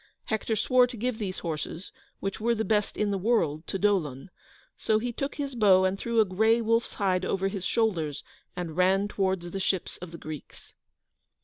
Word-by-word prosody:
Hector 220 0 -1
swore 250 +3 +4
to 245 -1 -8
give 245 +1 -2
these 190 -4 -3
horses, 165 +2 -5 0.3
which 195 0 -3
were 235 +1 +2
the 220 0 -1
best 210 -2 0
in 210 -1 +1
the 195 - -1
world, 175 -8 +1
to - - -2
Dolon, 180 -7 0 0.4
so 220 - +1
he 240 +2 -2
took 275 +4 -3
his 280 -2 -3
bow 195 -5 +5
and 185 +1 +1
threw 235 -1 0
a 220 - +6
grey 220 +5 +3
wolf's 230 +1 +1
hide 185 -3 +1
over 195 +1 0
his 195 -2 -3
shoulders, 175 -11 0 0.3
and 175 -3 -4
ran 190 +3 +3
towards 190 -4 -1
the 195 - -3
ships 190 -1 -1
of 180 - -8
the 170 - -9
Greeks. 155 -3 -10
195 Hz, 195 wpm, -28 LUFS, 180-225 Hz, 0.4 s, a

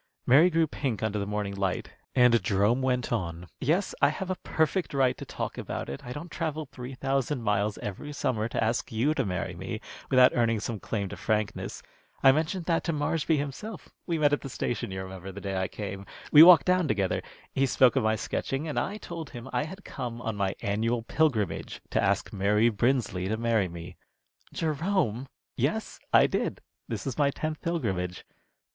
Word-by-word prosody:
Mary 150 +8 +7
grew 165 -1 +3
pink 135 -7 -3
under 105 -1 0
the 100 - -3
morning 105 -1 -2
light, 95 -2 -2 0.2
and 125 -3 +5
Jerome 105 +7 +2
went 125 -2 0
on: 85 0 -3
"Yes, 170 +9 +1
I 140 - +6
have 185 +5 -3
a - - 0
perfect 160 0 0
right 130 -2 +3
to - - -8
talk - - -5
about - - -4
it, 70 - -6
I 125 - -7
don't 155 +6 -7
travel 155 -2 -3
three 130 -1 -8
thousand 135 -1 -1
miles 105 0 +1
every 105 +9 -6
summer 115 -6 -1
to - - 0
ask 110 +2 -1
you 120 +7 +2
to 135 - 0
marry 90 -5 -3
me - - -5 0.3
without 130 -1 +7
earning 115 -2 +2
some 110 0 -4
claim 100 -1 -2
to - - -7
frankness. 110 -1 -2 0.4
I 135 - +9
mentioned 160 +5 -1
that 165 -2 +1
to 170 - +1
Marshby 155 +1 +1
himself. 145 +8 -5 0.2
We 170 - 0
met 145 -2 +3
at 145 - +1
the 135 - -6
station, 120 -3 -2
you 95 0 -4
remember, 95 0 -8
the 100 - -8
day 100 -1 -4
I 95 0 0
came. 100 -2 -6 0.2
We 150 - +10
walked 170 -2 +9
down 180 -2 +3
together. 100 -6 0 0.3
He 135 0 +2
spoke 130 0 +4
about 135 - +2
my 110 0 +3
sketching, 135 +7 -3
and 150 - -1
I 205 - -2
told 170 -6 -7
him 120 0 -9
I 125 +4 +1
had 190 +5 -10
come 120 -1 -5
on 115 - -2
my 100 -1 -1
annual 115 +3 0
pilgrimage, 125 -7 0
to - - +2
ask - - 0
Mary 105 +3 +3
Brinsley 115 -5 0
to 110 +2 -1
marry 115 -4 +2
me." 85 0 -9 0.5
"Jerome!" 155 - 0 0.3
"Yes, - - -1
I - - +7
did. - - -1 0.3
This - - -4
is 135 +1 -4
my 145 -1 +4
tenth 155 +2 -4
pilgrimage. 95 - -2
125 Hz, 195 wpm, -28 LUFS, 105-150 Hz, 0.5 s, We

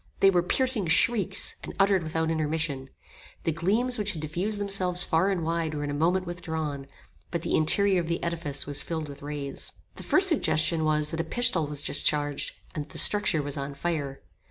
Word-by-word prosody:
They 195 - +6
were 175 -2 +3
piercing 235 +1 +1
shrieks, 195 +3 +2
and - - -8
uttered 195 -1 +4
without 160 0 -2
intermission. 155 -4 -2 0.5
The 165 - +1
gleams 215 +10 0
which 210 0 0
had 160 - -6
diffused 185 +8 -1
themselves 185 -3 +1
far 165 +4 +1
and 185 -4 -1
wide 165 -1 -2
were 145 - -3
in 145 - -3
a - - -3
moment 175 +5 +1
withdrawn, 160 -5 -5 0.4
but 170 -2 -3
the - - -2
interior 190 +5 +4
of 165 - -6
the 170 0 -2
edifice 165 -4 -3
was 145 0 0
filled 160 -2 -4
with 140 -1 -10
rays. 145 -1 -4 0.2
The - - -6
first 380 +1 +4
suggestion 160 - +2
was 150 -1 +1
that 165 - -4
a - - -3
pistol 180 -3 +2
was 145 0 -2
discharged, 145 -1 0 0.2
and 150 - -4
that 150 - -14
the - - -6
structure 205 -7 +3
was 145 +1 -4
on 140 0 -5
fire. 145 -3 -3
165 Hz, 200 wpm, -27 LUFS, 150-190 Hz, 0.5 s, They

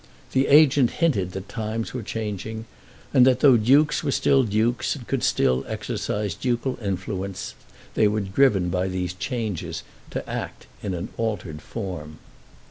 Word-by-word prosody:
The 135 +1 +2
agent 140 -4 +6
hinted 100 - +1
that 95 +1 -6
times 110 0 -4
were 125 - -3
changing, 110 +1 -5 0.5
and 125 - +7
that 130 -1 +3
though 135 -4 +7
dukes 135 +9 +4
were 145 - -1
still 135 0 +3
dukes, 110 +5 0
and 125 -5 -10
could 135 -2 -1
still 65 0 +2
exercise 105 -3 -3
ducal 125 +3 -2
influences, 95 -1 -4 0.4
they 110 - +4
were 105 +1 0
driven 95 -2 +2
by 90 +2 0
these 90 -1 -2
changes 110 - -4 0.3
to - - -5
act - - -5 0.2
in 95 -3 -3
an 85 - -5
altered 100 -9 -3
form. 85 -8 -6
110 Hz, 150 wpm, -24 LUFS, 95-125 Hz, 0.5 s, and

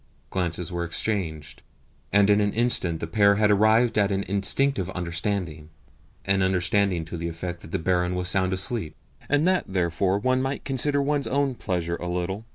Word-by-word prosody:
Glances 90 -1 -2
were 85 0 -2
exchanged, 85 -5 -3 0.5
and 100 0 +4
in 105 +1 +4
an 105 0 0
instant 110 -8 +1
the - - -2
pair 100 +4 +3
had 105 0 +3
arrived 110 +2 +3
at 100 -1 +2
an 100 0 -1
instinctive 100 +3 +1
understanding 85 -3 -3 0.6
an 95 0 +2
understanding 95 -1 +1
to 85 +2 -7
the 85 +1 -4
effect 85 +1 -6
that - - -11
the 95 - -1
barin 90 0 0
was 90 0 0
sound 95 0 +3
asleep, 95 -1 -2 0.3
and 145 +4 +2
that 185 0 +2
therefore 95 +1 0
one 130 +5 +1
might 135 +1 -3
consider 140 +1 +1
one's 145 0 0
own 140 0 0
pleasure 85 -6 -3
a 90 - -6
little. 90 +4 -3
95 Hz, 175 wpm, -25 LUFS, 85-110 Hz, 0.6 s, and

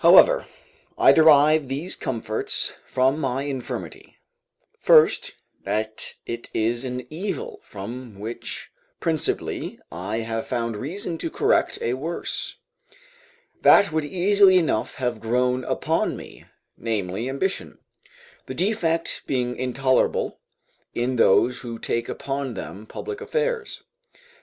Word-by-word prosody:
However, - - +7 0.5
I - - +7
derive 155 -1 +6
these 145 +7 -1
comforts 110 -3 -2
from 130 +4 +2
my 135 -1 -1
infirmity: 135 -3 -6 0.6
first, - - +5 0.3
that 110 +2 -3
it 120 0 -5
is 120 +3 +1
an 125 -1 -4
evil 410 - -4
from 115 - -8
which 110 +3 -6 0.3
principally 160 -3 -2
I 100 +7 -3
have 115 0 -3
found 115 -3 -1
reason 165 - -4
to - - -2
correct - - +2
a 120 - +1
worse, 160 +7 -4 1.1
that 200 -4 +7
would 155 0 0
easily 190 +4 +5
enough 160 -11 0
have 125 -3 -2
grown 125 +2 +1
upon - - 0
me, - - -12 0.3
namely, 110 +1 -2
ambition; 160 +9 -2 0.7
the - - -5
defect 170 -4 0
being 125 -2 0
intolerable 130 +1 +1 0.6
in 125 +1 0
those 125 +3 +4
who 115 -2 -6
take 115 +1 -2
upon 135 -3 -3
them 105 +2 -7
public 430 -2 -6
affairs. 470 -2 -2
130 Hz, 115 wpm, -24 LUFS, 115-165 Hz, 1.1 s, However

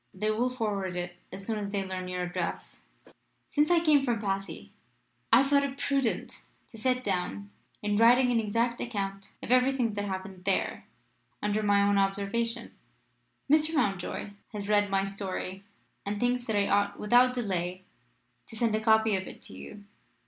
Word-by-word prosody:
They 215 +3 0
will 235 +4 +1
forward 205 -7 -2
it 175 0 -4
as 195 - -8
soon 220 -1 -2
as 200 -1 -4
they 200 -1 -2
learn 185 -1 -5
your 180 0 -3
address. 180 0 -4 0.7
"Since 295 0 +3
I 340 -1 +3
came 300 -2 +6
back 275 - -3
from 240 -3 0
Passy 195 -1 -4 0.6
I - - +8
have - - -1
thought 280 0 +5
it 275 -1 -3
prudent 275 -4 -1 0.3
to 225 - -11
set 255 +2 +1
down 200 +1 -2 0.3
in 205 0 +1
writing 245 +3 +6
an 235 - +3
exact 230 +2 0
account 195 -4 -4
of - - -4
everything 255 -2 +3
that 205 0 -3
happened 190 -1 -6
there 195 - 0 0.6
under 210 +1 +1
my 205 -1 +3
own 200 0 +3
observation. 200 +4 -1 0.7
Mr. 310 +2 +3
Mountjoy 200 - -1 0.2
has 205 -1 -5
read 205 -1 +3
my 195 0 +1
story, 195 -1 -5 0.4
and 205 +1 -3
thinks 245 0 +1
that 220 - -1
I 200 -1 +2
ought 200 0 +1
without 245 +4 +4
delay 185 -5 -2 0.6
to - - -11
send 225 -1 +1
a 215 - +1
copy 220 -1 +4
of 190 0 -3
it - - -10
to - - -11
you. 210 -1 -10
210 Hz, 180 wpm, -29 LUFS, 195-245 Hz, 0.7 s, I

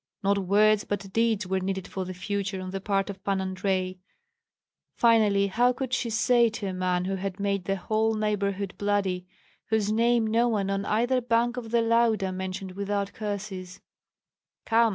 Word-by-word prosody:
Not 200 +1 +2
words, 210 +2 +3
but 195 -1 -4
deeds 225 -3 +1
were 190 +1 0
needed 190 0 -3
for 190 -1 -4
the 185 - -5
future 195 +1 -3
on 185 0 -6
the 195 0 -4
part 195 0 0
of 200 - -13
Pan 195 -1 0
Andrei. 185 -1 -2 1.0
Finally, 215 -4 +4
how 240 +6 +2
could 255 0 -4
she 240 - 0
say 235 +1 +3
to 220 -1 -6
a 190 - -2
man 180 -1 0
who 195 +1 -2
had 195 +1 -4
made 200 -2 -1
the 195 - 0
whole 220 +3 0
neighborhood 200 -2 -1
bloody, 195 -3 0 0.4
whose 215 -2 +1
name 230 +1 +3
no 230 +2 +2
one 200 -4 0
on 195 0 -1
either 245 +4 +1
bank 240 0 +1
of 240 -3 -6
the 235 0 +2
Lauda 225 -4 +2
mentioned 185 0 -5
without 200 +1 -2
curses, 200 -3 -5 0.9
"Come! 230 0 +4
200 Hz, 175 wpm, -27 LUFS, 190-225 Hz, 1.0 s, Finally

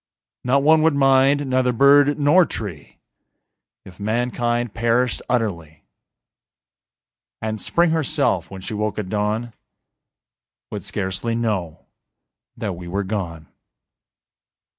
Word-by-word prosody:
Not 135 +3 +2
one 155 +1 +5
would 160 -2 +3
mind, 135 +1 +3
neither 130 -1 +1
bird 140 +4 +5
nor 150 +5 +5
tree 100 - -7 0.9
If 95 0 -14
mankind 120 +1 -1
perished 120 +1 0
utterly; 85 -11 -2 1.6
And 110 -1 -4
Spring 170 -1 +2
herself, 150 - 0
when 95 -1 -9
she 100 - -6
woke 105 0 -2
at 105 -4 -4
dawn, 110 +3 -2 1.2
Would - - -5
scarcely 95 +4 -3
know 105 -9 -3 0.7
that 110 -5 -3
we 85 0 -9
were 100 +3 -2
gone. 90 -6 -5
115 Hz, 110 wpm, -21 LUFS, 100-135 Hz, 1.6 s, one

